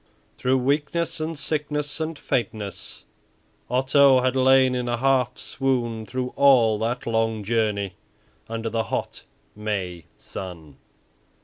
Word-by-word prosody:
Through 130 +1 +1
weakness 150 +6 0
and 155 0 -3
sickness 150 0 -2
and 160 0 -3
faintness, 110 -8 -3 0.6
Otto 130 +1 +5
had 130 0 +1
lain 130 0 +5
in 125 -1 -2
a 120 - 0
half 130 -1 +2
swoon 120 -5 -2
through 125 0 -3
all 120 -6 +5
that 120 +2 -2
long 115 -2 0
journey 105 -3 0 0.6
under 115 0 -3
the 115 0 0
hot 115 - -4 0.3
May 95 -5 -3
sun. 85 -7 -8
125 Hz, 120 wpm, -24 LUFS, 110-135 Hz, 0.6 s, Otto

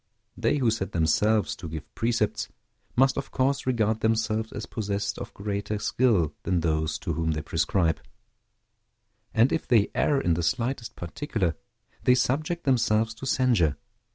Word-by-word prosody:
They 115 +5 +1
who 125 -5 +2
set 105 -3 -3
themselves 105 +7 +2
to 85 -1 -7
give 80 -1 -8
precepts 115 -2 0 0.5
must 135 +2 +4
of 140 - -3
course 135 +1 0
regard 110 -3 +1
themselves 110 0 0
as 110 - -5
possessed 100 -3 -3
of - - -7
greater 100 +1 -3
skill 105 - +2
than 90 -3 0
those 80 -1 0
to - - -3
whom 80 -1 0
they 75 -1 -3
prescribe; 85 -5 +1 1.3
and 115 +4 +4
if 160 - -1
they 110 -4 +3
err 145 -2 +2
in 85 - +1
the 85 - -1
slightest 120 +5 -1
particular, 90 - -2 0.5
they 125 - +5
subject 150 +7 0
themselves 115 -4 +2
to 130 +4 -7
censure. 110 - +2
110 Hz, 155 wpm, -26 LUFS, 90-125 Hz, 1.3 s, they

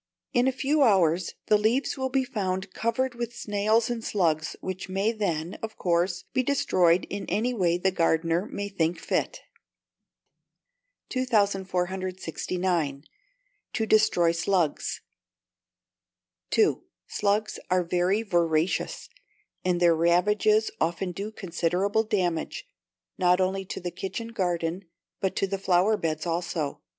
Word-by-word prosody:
In 245 0 +3
a - - +4
few 280 +3 +1
hours 185 - +3
the 210 - +4
leaves 230 +6 +1
will 265 -1 -2
be 265 0 +1
found 195 -6 -3
covered 255 +3 -1
with 240 0 -5
snails 215 +2 +1
and 240 -2 -3
slugs, 160 -7 0
which 185 0 -5
may 195 +4 +1
then, 175 -6 -2
of 220 -1 -6
course, 175 0 0
be 260 - +3
destroyed 185 -10 +2
in 200 0 -4
any 220 +7 0
way 175 -6 +2
the 190 +2 +1
gardener 165 +1 +1
may 200 0 -4
think 175 -4 0
fit. - - -2 1.7
2469. 185 - -1 0.7
To 220 - 0
Destroy 215 -6 +4
Slugs 170 -2 0 1.5
(2). - - +2 0.2
Slugs 210 +1 0
are 185 0 +3
very 180 +5 +1
voracious, 175 - 0 0.6
and 180 -1 +1
their 170 -1 +5
ravages 210 +6 +3
often 175 +3 0
do 200 +5 -5
considerable 190 +2 0
damage, 180 - -1 0.5
not 180 0 +4
only 190 +1 0
to - - -5
the 175 -1 -4
kitchen 225 +6 -5
garden, 180 -3 -2 0.3
but 190 - -1
to - - +1
the 195 0 -3
flower 190 +3 +3
beds 155 -5 -2
also. 165 -3 -2
190 Hz, 125 wpm, -27 LUFS, 175-215 Hz, 1.7 s, their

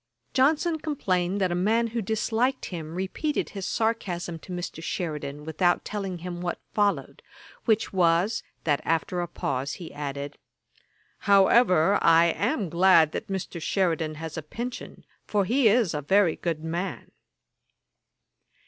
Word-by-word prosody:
] - - -45
Johnson 315 +5 +2
complained 190 - -1
that 185 -2 +1
a 180 +3 0
man 230 +1 +3
who 235 - 0
disliked 225 +5 0
him 165 -2 -6
repeated 190 - -2
his 195 -3 -5
sarcasm 180 -7 -2
to 185 - -12
Mr. 175 -2 -5
Sheridan, 150 -4 -4
without 175 +3 +1
telling 195 -3 -4
him 175 0 -6
what 175 -1 -2 0.2
followed, 200 -10 0 0.4
which 220 -3 +1
was, 175 +3 +2 0.2
that 145 -3 +1
after 165 +2 0
a 175 - -3
pause 135 -4 -3
he 170 -3 -8
added, 145 0 -5 0.8
'However, 195 -2 +5
I 165 0 +5
am 230 - 0
glad 170 -2 +5
that - - -5
Mr. 190 -3 -4
Sheridan 165 -4 0
has 160 +1 -6
a - - -6
pension, 235 +11 -7 0.2
for 205 -2 +1
he 245 +4 +3
is 215 -4 +3
a 150 - -2
very 190 +3 +3
good 165 -2 -3
man.' 170 +4 -4
180 Hz, 145 wpm, -26 LUFS, 160-210 Hz, 0.8 s, However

